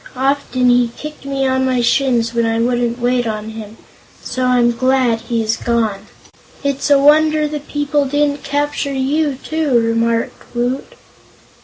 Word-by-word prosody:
Often 260 -2 +1
he 245 0 +3
kicked 300 -2 -9
me 275 -1 -1
on 260 0 +1
my 260 -1 +1
shins, 240 -1 +1
when 235 0 +1
I 225 0 0
wouldn't 240 0 0
wait 245 -1 0
on 215 0 -4
him. 220 0 -9 0.5
So 255 0 -2
I'm 245 -1 +3
glad 255 -1 +1
he 230 -1 -2
is 220 +1 -1
gone." 225 -4 -1 0.6
"It's 280 0 -1
a 285 - +6
wonder 305 +2 +4
the 300 0 -4
people 290 0 -1
didn't 290 +1 0
capture 285 0 -1
you, 280 +2 0
too," 295 -2 0
remarked 230 +1 -1
Woot. 245 +3 -2
255 Hz, 155 wpm, -17 LUFS, 235-285 Hz, 0.6 s, a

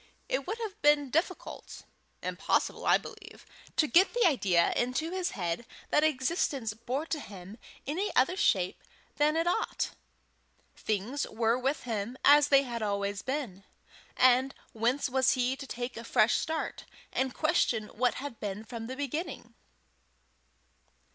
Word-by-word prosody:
It - - -2
would 445 - -2
have 430 -1 -6
been 290 -2 +4
difficult 345 +5 -3 0.4
impossible, - - -1
I - - +6
believe 430 -1 -12 0.3
to 310 - +4
get 360 +9 +4
the 485 - +4
idea 195 - +3
into 255 +7 -1
his 370 -1 -1
head 175 +3 -2 0.3
that 300 - +4
existence 270 -5 0
bore 245 +7 -3
to 325 -2 -3
him 200 -2 -10 0.3
any 355 +9 -1
other 265 +8 +4
shape 185 - +1 0.3
than 300 +1 +3
it 330 - +1
ought. 350 - -1 0.8
Things 220 +7 -2
were 225 +1 +1
with 265 +4 -1
him 230 +1 -3
as 290 0 +7
they 275 -1 +5
had 240 -3 -5
always 200 -1 -1
been, 260 -9 -4 0.5
and 255 +1 +4 0.2
whence 240 +5 +1
was 265 0 +3
he 255 0 0
to 275 - -9
take 245 0 -5
a 230 - -7
fresh 230 -1 +3
start, 320 0 -3 0.3
and 260 -1 -1
question 310 -8 +2
what 245 +2 0
had 280 -3 -6
been 205 0 -4
from 225 0 -7
the 260 - -5
beginning? 285 +5 -4
260 Hz, 150 wpm, -30 LUFS, 225-305 Hz, 0.8 s, as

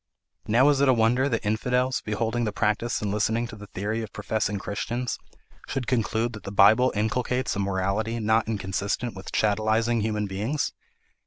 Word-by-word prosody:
"Now 120 +6 +5
is 140 -2 +3
it 140 - +4
a 130 - +5
wonder 120 +4 +3
that 115 -4 -2
infidels, 125 +4 +1
beholding 110 +2 -1
the 110 - 0
practice 105 +3 0
and 105 - -1
listening 110 +3 +1
to - - -8
the 105 0 -11
theory 105 +5 -3
of 110 -2 -7
professing 105 -1 -2
Christians, 120 +5 -3 0.5
should 135 -2 -3
conclude 115 -1 0
that 110 - -8
the 100 - -6
Bible 110 +6 +5
inculcates 125 +3 0
a - - -2
morality 100 +4 -1
not 110 +1 +2
inconsistent 100 +3 -2
with 95 0 -8
chattelising 110 +2 +1
human 105 -1 -1
beings? 105 +10 -2
110 Hz, 170 wpm, -26 LUFS, 105-120 Hz, 0.5 s, Now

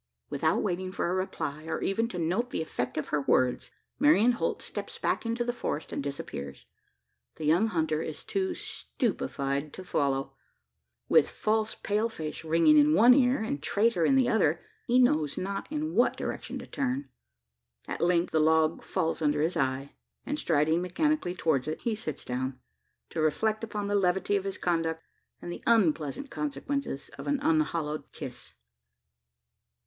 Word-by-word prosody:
Without 160 +3 +1
waiting 185 -1 -2
for 175 -2 -1
a - - 0
reply, 155 -5 -3
or 160 0 -2
even 225 +4 +1
to 205 - -6
note 180 +9 0
the 160 - -2
effect 125 -5 -3
of 155 - -2
her 150 - +1
words, 130 -2 +2 0.3
Marian 255 -5 +5
Holt 240 - -2
steps - - -5
back - - -1
into 230 +1 0
the 240 0 -1
forest, 155 -9 -3
and - - -2
disappears. 70 - -6 0.7
The 155 - -5
young 170 +9 +4
hunter 160 -5 0
is 155 -2 -5
too 380 -2 -1
stupefied 140 - -2
to 185 - -8
follow. 140 -5 0 0.7
With - - +5
"false 220 0 0
pale 215 +3 0
face" 160 -7 -5
ringing 165 - +5
in 300 +1 +5
one 240 +3 +8
ear, 250 -2 +3
and 145 -10 -3
"traitor" 200 +3 +2
in 270 - +4
the 260 -2 +4
other, 175 -9 +2 0.3
he 245 - +4
knows 155 - +3
not 195 +7 -4
in 310 +1 -2
what - - +3
direction - - -4
to - - -7
turn. 275 0 -2 0.8
At - - -4
length 175 0 +2
the 160 - +2
log 160 +1 +3
falls 165 -3 -1
under 150 -1 +2
his 170 +3 0
eye; 135 -1 -1 0.3
and 295 +2 -2
striding 160 +1 +2
mechanically 180 - 0
towards 155 -6 +1
it, 155 - -3
he 230 - 0
sits 180 -9 -5
down 130 +1 -3 0.5
to 160 - -2
reflect 215 +8 +1
upon 210 -2 -3
the 205 - -1
levity 190 0 +2
of 195 -1 -1
his 195 - -3
conduct, 165 -2 -1 0.4
and 175 - -5
the - - -8
unpleasant 185 - +2
consequences 280 - -3
of - - -7
an 285 -1 +1
unhallowed 170 - 0
kiss. - - -8
180 Hz, 170 wpm, -29 LUFS, 155-230 Hz, 0.8 s, one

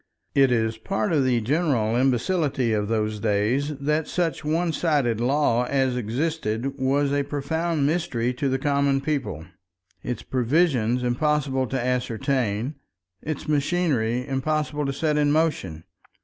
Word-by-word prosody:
It 135 -2 +4
is 110 -2 0
part 195 - -1
of 145 -4 +3
the 125 -2 +2
general 125 -4 +1
imbecility 130 0 +1
of 105 -1 0
those 110 -1 -1
days 115 +8 0
that 150 +3 0
such 170 -4 -1
one 165 +2 0
sided 140 -10 +1
law 125 -2 +2
as 130 -2 +1
existed 125 +1 -2
was 140 +2 +1
a 145 - +2
profound 145 +2 -1
mystery 140 -7 0
to 135 +2 -1
the 130 - +1
common 140 0 +1
people, 135 - -3 0.6
its 125 - -4
provisions 125 -2 +1
impossible 135 +1 0
to 130 - -2
ascertain, 125 0 -1 0.4
its 155 -1 -5
machinery 140 -6 0
impossible 150 +1 -1
to - - 0
set 150 +1 0
in 145 -1 +3
motion. 145 - 0
135 Hz, 135 wpm, -24 LUFS, 120-150 Hz, 0.6 s, It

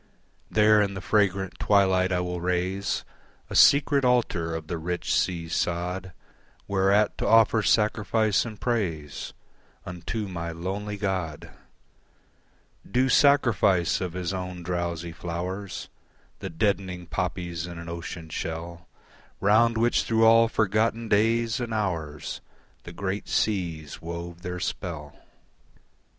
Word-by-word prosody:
There 105 0 +5
in 100 -1 -1
the - - -4
fragrant 95 -2 0
twilight 95 -2 +3
I 90 0 +1
will 90 -1 -3
raise 90 +2 -1 0.5
A - - -4
secret 140 0 +5
altar 110 -10 +1
of 80 -1 -5
the 85 +1 -4
rich 90 +2 -2
sea 85 -3 0
sod, 90 +2 -2 0.6
Whereat 100 +2 +2
to - - -1
offer 115 -1 +5
sacrifice 105 0 +2
and 110 -3 -8
praise 85 - -2 0.5
Unto 90 +5 -4
my 85 -2 -4
lonely 100 +5 -4
god: 95 -7 -3 1.4
Due 130 +2 +2
sacrifice 110 - +4
of 90 -3 -3
his 90 0 -3
own 90 -1 -5
drowsy 85 -1 -3
flowers, 90 +3 -5 0.5
The 95 - -5
deadening 90 0 -1
poppies 85 -1 -3
in 85 -1 -8
an 85 0 -8
ocean 85 -1 -6
shell 85 +1 -5 0.5
Round 115 +3 +4
which 120 +2 +3
through 115 0 +3
all 115 +1 +6
forgotten 110 +1 0
days 115 +2 +2
and 120 -2 -4
hours 80 -8 -3 0.4
The 85 - -8
great 100 +3 -4
seas 85 -8 -1
wove 85 +1 -7
their 90 0 -5
spell. 80 -6 -5
95 Hz, 125 wpm, -26 LUFS, 85-105 Hz, 1.4 s, all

